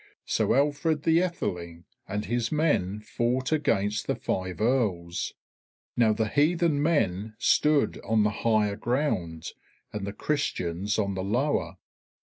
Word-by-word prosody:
So - - +1
Alfred 150 +2 +1
the 165 0 +4
Aetheling 85 - -3 0.2
and 105 +1 -3
his 120 0 -1
men 105 - +1
fought 125 +5 -1
against 110 -9 +1
the - - +1
five 95 -1 -3
Earls. 105 -8 0 0.6
Now 115 -2 +4
the 110 +1 0
heathen 155 +3 +2
men 110 - 0
stood 150 -1 +2
on 110 -1 +2
the 105 - +2
higher 110 -3 +2
ground 105 - -1 0.4
and 105 -2 -4
the - - -3
Christians 100 - -1
on 100 -2 0
the 95 0 -3
lower. 125 +9 0
110 Hz, 130 wpm, -27 LUFS, 100-145 Hz, 0.6 s, the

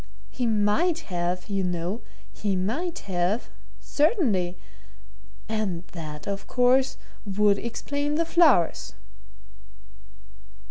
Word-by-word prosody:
He 245 - -1
might 225 - +2
have, 175 +1 -1
you 195 -2 -1
know, 180 +4 -2 0.3
he 200 -2 -1
might 260 - -1
have 185 +4 -1 0.3
certainly! 225 - +1 0.9
And 210 -6 -2
that, 155 -3 -7
of 200 0 -4
course, 255 +1 +3 0.3
would 205 0 +2
explain 285 +5 -2
the 335 +2 +1
flowers." 270 - +3
205 Hz, 95 wpm, -26 LUFS, 180-260 Hz, 0.9 s, course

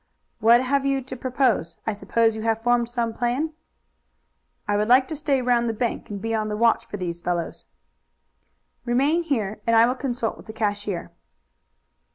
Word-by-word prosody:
"What 235 +3 +5
have 275 +1 +1
you 275 -1 0
to 260 +1 -7
propose? 255 - 0
I 220 - 0
suppose 225 +2 +1
you 220 - -5
have 225 0 0
formed 240 -1 +2
some 235 -2 -2
plan." 250 +8 -1 1.1
"I 205 - +1
would 210 +1 +1
like 255 +2 +5
to 315 - -3
stay 280 -3 0
round 240 -1 +2
the 225 - -2
bank 235 +2 -2
and 205 -1 -5
be 225 +2 -3
on 215 -1 0
the 210 - -3
watch 230 +1 +2
for 205 - -6
these 170 -2 -4
fellows." 175 -1 -3 1.2
"Remain 275 +7 +2
here 220 - -2
and 230 - +4
I 225 +1 +7
will 245 - +1
consult 245 -4 -3
with - - -15
the 220 - -8
cashier." 205 -4 -2
235 Hz, 185 wpm, -24 LUFS, 215-255 Hz, 1.2 s, I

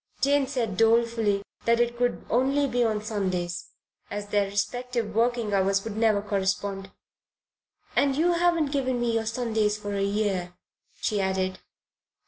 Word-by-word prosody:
Jane 280 0 +3
said 235 -8 -2
dolefully 225 -3 +3 0.2
that 235 0 +3
it 240 0 +1
could 245 0 -1
only 270 +4 +2
be 245 -2 +1
on 215 -2 0
Sundays, 185 -5 -2 0.4
as 205 0 -5
their 205 -1 +1
respective 225 +2 -2
working 230 -1 +1
hours 195 0 +2
would 220 -2 -5
never 215 -2 +2
correspond 195 -1 -2 1.1
"And 275 -1 +3
you 340 +3 +3
haven't 340 -4 +2
given 260 -3 0
me 240 -1 0
your 225 -1 0
Sundays 220 -3 0
for 205 -1 -5
a 200 - -1
year," 195 -3 -1 0.4
she 210 -2 0
added. 190 -1 -1
220 Hz, 145 wpm, -26 LUFS, 200-245 Hz, 1.1 s, Jane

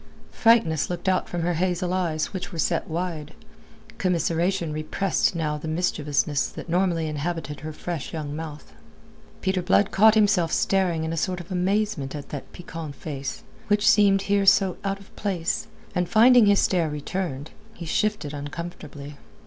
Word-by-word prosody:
Frankness 220 - +3
looked 175 +2 -4
out 185 -1 +1
from 175 -1 -2
her 175 +1 +1
hazel 180 +1 0
eyes 170 -3 -1
which 185 0 -5
were 170 - -7
set 160 - 0
wide; 165 -2 -4 0.6
commiseration 170 -1 0
repressed 160 +5 0
now 150 -2 -1
the 160 - -6
mischievousness 150 -3 0
that - - -9
normally 175 -1 +1
inhabited 150 0 -4
her 155 +1 -6
fresh 165 0 -5
young 150 -2 -4
mouth. 150 - -8 0.7
Peter 190 -1 0
Blood 195 +2 +3
caught 220 +2 +6
himself 200 -6 +3
staring 180 -4 +1
in 160 0 -2
a - - -3
sort 180 +2 -1
of 175 +2 -10
amazement 185 -5 0
at 145 - -7
that 145 - -7
piquant 165 -4 -8
face, 140 -2 -6 0.2
which 205 0 +2
seemed 200 -2 +5
here 200 -1 +1
so 190 -2 +4
out 195 0 -2
of 200 - -18
place, 185 -5 -2 0.3
and 180 -2 -1
finding 235 +1 +6
his 205 0 +5
stare 170 -4 +2
returned, 150 -1 -4 0.2
he 170 - -7
shifted 190 -3 -1
uncomfortably. 145 -1 -7
175 Hz, 160 wpm, -25 LUFS, 155-190 Hz, 0.7 s, caught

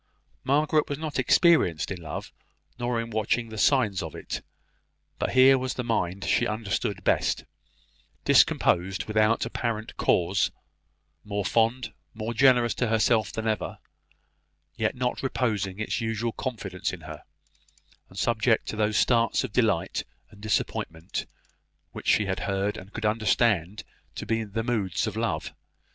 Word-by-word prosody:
Margaret 150 +2 +2
was 145 - -2
not 155 -2 -3
experienced 130 - +3
in 90 -2 -5
love, 80 - -6 0.5
nor 120 -1 -1
in 115 0 -4
watching 110 +2 0
the 110 - -8
signs 110 -9 +3
of - - -6
it; - - -5 0.8
but - - -1
here 130 +1 +7
was 130 0 -3
the 125 - -3
mind 100 -5 -1
she - - +2
understood 110 -2 -2
best, - - +1 0.8
discomposed 90 +2 +3
without 110 +1 +2
apparent 110 -2 -3
cause 90 +2 +2 0.7
more 100 -1 -3
fond, 115 +2 +1 0.2
more 110 +1 -4
generous 125 -1 +4
to 125 - -1
herself 110 -2 +2
than 110 0 -4
ever, 110 -1 -2 1.0
yet - - -1
not 125 0 -2
reposing 105 -8 -1
its 110 - -2
usual 115 +1 -1
confidence 105 -8 -4
in 90 - -8
her 80 -1 -9 0.9
and 95 - -15
subject 115 +2 +2
to - - -4
those 105 0 +1
starts 115 0 +3
of 125 -5 -5
delight 110 -9 +1 0.3
and 105 -2 -16
disappointment 85 -5 -2 0.6
which - - -9
she 105 - +4
had 95 -1 -2
heard 100 +1 0
and 95 +2 -10
could 115 0 -5
understand 105 -3 +1 0.3
to - - -5
be 115 0 0
the 110 +2 -3
moods 110 -7 -1
of 110 -2 -4
love. 115 +1 -2
110 Hz, 145 wpm, -26 LUFS, 100-120 Hz, 1.0 s, here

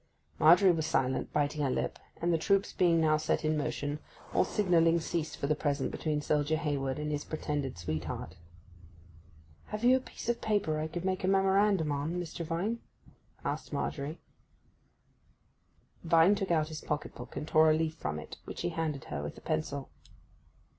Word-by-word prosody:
Margery 175 +4 +7
was 160 -2 -1
silent, 130 -5 0
biting 145 +1 0
her 140 - +1
lip; - - -2 0.2
and 170 +1 +1
the 165 - +2
troops 195 +4 +2
being 170 -2 +3
now 155 -1 +4
set 155 +1 0
in 155 0 +2
motion, 145 0 -2 0.3
all - - +4
signalling 170 -4 +3
ceased 165 -1 -3
for - - -2
the 150 - +3
present 145 -2 -1
between 150 -2 -1
soldier 150 +1 +1
Hayward 140 -4 -1
and 150 0 -3
his 145 -1 -2
pretended 145 - -3
sweetheart. 80 0 -4 1.3
'Have 210 +2 -5
you 250 +2 +7
a - - +2
piece 255 - -10
of 235 0 0
paper 205 -7 +1
that - - -1
I 155 - -1
could 175 +2 -5
make 185 -1 -1
a - - +1
memorandum 195 -3 +3
on, 145 +4 -2
Mr. 170 -1 -5
Vine?' 175 +8 -2 0.7
asked - - -3
Margery. 145 +2 -3 1.8
Vine 165 +3 +5
took 195 -2 -2
out 155 -2 +2
his 155 -1 -6
pocket 150 0 -3
book 125 0 -10
and 150 - -4
tore 155 0 +5
a 155 - +5
leaf 160 -1 0
from 75 - -4
it, 75 - -8
which - - -6
he - - 0
handed 160 -5 -2
her 70 -1 -5
with 75 - -6
a - - -11
pencil. 135 - -3
155 Hz, 180 wpm, -31 LUFS, 145-175 Hz, 1.8 s, Margery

